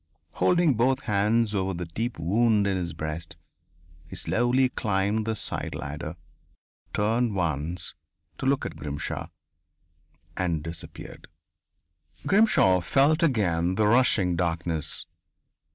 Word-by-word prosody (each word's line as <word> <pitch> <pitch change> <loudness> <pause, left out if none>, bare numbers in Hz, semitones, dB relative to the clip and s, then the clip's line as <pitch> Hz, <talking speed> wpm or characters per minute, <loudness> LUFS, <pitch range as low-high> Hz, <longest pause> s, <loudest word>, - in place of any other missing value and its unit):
Holding 175 -4 +3
both 130 +3 +2
hands 105 +1 +1
over 95 -1 -1
the 90 +1 -4
deep 115 +9 -4
wound 105 +5 +2
in 100 -1 +1
his 90 -2 -2
breast, 80 +2 -5 0.7
he - - -9
slowly 125 +3 +2
climbed 105 -2 -1
the 110 - 0
side - - -3
ladder, 75 +3 -5 0.8
turned 110 +1 +1
once, 85 -1 -2 0.5
to 130 - -1
look 135 0 +1
at - - -5
Grimshaw, 75 0 -4 1.1
and 85 -4 -1
disappeared.... 80 0 -8 1.0
Grimshaw 195 - +4
felt 140 - +3
again 95 - +1
the 105 - +2
rushing 105 -6 +3
darkness. 85 -2 -2
100 Hz, 115 wpm, -26 LUFS, 85-120 Hz, 1.1 s, Grimshaw